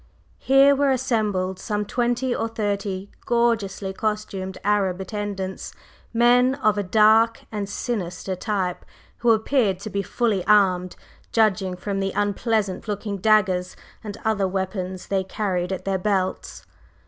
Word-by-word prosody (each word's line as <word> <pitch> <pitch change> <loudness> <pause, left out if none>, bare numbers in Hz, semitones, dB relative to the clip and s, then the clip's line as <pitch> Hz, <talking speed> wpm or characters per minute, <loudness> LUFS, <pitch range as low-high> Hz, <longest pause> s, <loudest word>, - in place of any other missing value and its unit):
Here 275 +1 +5
were 280 0 +2
assembled 210 -8 0
some 210 -1 -2
twenty 245 +3 0
or 225 - -1
thirty 200 -3 -3 0.2
gorgeously 220 -5 0
costumed 200 -3 -3
Arab 195 -3 +1
attendants, 195 -1 -5 0.4
men 245 +2 +4
of 215 -7 +2
a 205 - 0
dark 220 +3 +4
and 205 -2 -4
sinister 190 -4 -3
type, 185 -2 -2 0.4
who 240 - +2
appeared 220 -2 +2
to 215 - -6
be 200 - -1
fully 205 -1 0
armed, 185 -4 +3 0.4
judging 195 -4 +2
from 195 +2 -3
the 195 0 -1
unpleasant 205 0 -1
looking 205 -1 -3
daggers 190 -3 +2 0.3
and 210 -1 -6
other 210 -3 +1
weapons 190 -1 -3
they 195 -1 0
carried 190 -2 -2
at 190 - -4
their 195 -1 0
belts. 190 -1 -2
205 Hz, 135 wpm, -23 LUFS, 190-225 Hz, 0.4 s, Here